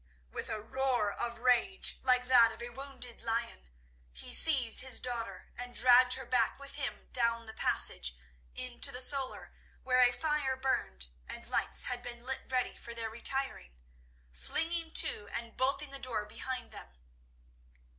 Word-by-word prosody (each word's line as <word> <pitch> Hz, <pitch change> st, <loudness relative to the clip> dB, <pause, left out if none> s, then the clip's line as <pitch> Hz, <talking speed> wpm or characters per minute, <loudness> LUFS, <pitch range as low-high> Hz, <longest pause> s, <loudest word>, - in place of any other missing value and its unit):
With -, -, -5 dB
a 215 Hz, -, -3 dB
roar 245 Hz, -1 st, 0 dB
of 235 Hz, -1 st, -4 dB
rage 255 Hz, +10 st, +1 dB
like 250 Hz, -1 st, +2 dB
that 245 Hz, -3 st, +5 dB
of -, -, -9 dB
a 240 Hz, 0 st, -5 dB
wounded 260 Hz, -2 st, -7 dB
lion, 230 Hz, -, -4 dB, 0.4 s
he 60 Hz, +1 st, -5 dB
seized 265 Hz, -8 st, +6 dB
his 260 Hz, -1 st, +1 dB
daughter 230 Hz, -6 st, -6 dB
and 245 Hz, 0 st, -8 dB
dragged 250 Hz, +1 st, +6 dB
her 265 Hz, -, -4 dB
back 240 Hz, -2 st, +1 dB
with 280 Hz, 0 st, -9 dB
him 285 Hz, -2 st, -4 dB
down 230 Hz, -1 st, 0 dB
the 220 Hz, -, -9 dB
passage -, -, +2 dB, 0.4 s
into 250 Hz, -1 st, +1 dB
the 250 Hz, -, -5 dB
solar 265 Hz, 0 st, -2 dB, 0.3 s
where 255 Hz, -1 st, +3 dB
a 245 Hz, -1 st, +6 dB
fire 300 Hz, -1 st, -1 dB
burned 65 Hz, -, -2 dB, 0.2 s
and -, -, -7 dB
lights -, -, -1 dB
had 245 Hz, -1 st, -3 dB
been 240 Hz, -1 st, -8 dB
lit 265 Hz, +1 st, -3 dB
ready 255 Hz, -1 st, -1 dB
for 235 Hz, -, -10 dB
their 225 Hz, -1 st, -4 dB
retiring, 235 Hz, -, -3 dB, 0.5 s
flinging 325 Hz, -, 0 dB
to 205 Hz, -, +6 dB
and 230 Hz, -1 st, -4 dB
bolting 275 Hz, +2 st, +2 dB
the 275 Hz, -, -7 dB
door 240 Hz, -5 st, -1 dB
behind 255 Hz, +2 st, -6 dB
them. -, -, -11 dB
245 Hz, 160 wpm, -31 LUFS, 230-265 Hz, 0.5 s, seized